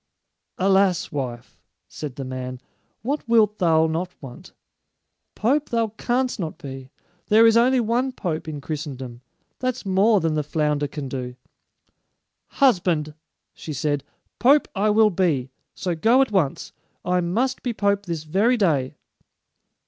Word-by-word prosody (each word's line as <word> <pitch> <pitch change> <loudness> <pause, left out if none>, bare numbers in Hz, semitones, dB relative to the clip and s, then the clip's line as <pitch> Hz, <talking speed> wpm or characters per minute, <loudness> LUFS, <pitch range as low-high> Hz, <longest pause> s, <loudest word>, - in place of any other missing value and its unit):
"Alas, 190 -2 +2
wife," 125 -4 -5 0.3
said 145 -5 -7
the 135 - -5
man, 130 -1 -5 0.4
"what 280 +6 -1
wilt 215 -2 +3
thou 160 -3 +4
not 170 +3 -3
want? 130 -4 -11 0.8
Pope 275 +7 +1
thou 230 -2 0
canst 245 +3 -1
not 165 -4 -4
be. 135 -4 -9 0.4
There 220 +2 +6
is 225 0 +5
only 250 +2 +4
one 240 +3 0
pope 165 -10 -4
in 150 -2 -5
Christendom. 135 -5 -6 0.4
That's 255 -2 -2
more 200 +3 +3
than 165 -2 0
the 155 - +1
flounder 150 -1 -1
can 140 0 -6
do." 125 -1 -5 1.1
"Husband," 175 - +2 0.4
she 155 - -7
said, 145 0 -1 0.4
"pope 280 +4 +5
I 210 +1 +1
will 215 0 +4
be; 155 -9 0 0.2
so 180 - -2
go 230 +11 +4
at 265 - -6
once. 175 -9 -1 0.3
I 180 0 +1
must 235 +10 -1
be 245 - -2
pope 200 -2 0
this 165 -3 -3
very 200 +11 +2
day." 150 - +1
180 Hz, 140 wpm, -23 LUFS, 150-225 Hz, 1.1 s, There